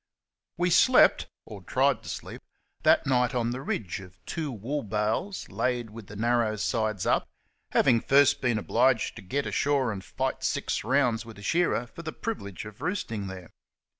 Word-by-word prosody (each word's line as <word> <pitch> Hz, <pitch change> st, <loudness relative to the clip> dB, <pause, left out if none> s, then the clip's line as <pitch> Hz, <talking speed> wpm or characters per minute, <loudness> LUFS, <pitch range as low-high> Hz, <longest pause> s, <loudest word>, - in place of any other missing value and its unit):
We 175 Hz, +1 st, +1 dB
slept, 255 Hz, +9 st, +5 dB, 0.2 s
or -, -, -10 dB
tried -, -, +1 dB
to -, -, -9 dB
sleep, -, -, -7 dB, 0.4 s
that -, -, +4 dB
night 125 Hz, -2 st, +2 dB
on 120 Hz, -1 st, 0 dB
the 125 Hz, +2 st, -4 dB
ridge 105 Hz, -8 st, -3 dB
of 95 Hz, -1 st, -13 dB
two 155 Hz, -4 st, -3 dB
wool 130 Hz, +6 st, -3 dB
bales 110 Hz, -, -2 dB
laid 120 Hz, -3 st, -1 dB
with 110 Hz, -2 st, -10 dB
the 105 Hz, -, -10 dB
narrow 115 Hz, 0 st, +1 dB
sides 110 Hz, -2 st, -1 dB
up, -, -, +1 dB, 0.4 s
having 120 Hz, -4 st, +4 dB
first 140 Hz, +1 st, +4 dB
been 125 Hz, -3 st, +1 dB
obliged 120 Hz, +2 st, +2 dB
to -, -, -8 dB
get 135 Hz, +9 st, -2 dB
ashore 140 Hz, -4 st, +1 dB
and 95 Hz, -2 st, -6 dB
fight -, -, -3 dB
six -, -, -1 dB
rounds 125 Hz, -5 st, +2 dB
with 115 Hz, -2 st, -12 dB
a 100 Hz, -, -11 dB
shearer 170 Hz, -3 st, +1 dB
for 120 Hz, -, -11 dB
the 160 Hz, -2 st, -6 dB
privilege 105 Hz, -, -5 dB
of 105 Hz, -1 st, -11 dB
roosting 115 Hz, -, -3 dB
there. 95 Hz, -2 st, -9 dB
120 Hz, 175 wpm, -27 LUFS, 105-140 Hz, 0.4 s, slept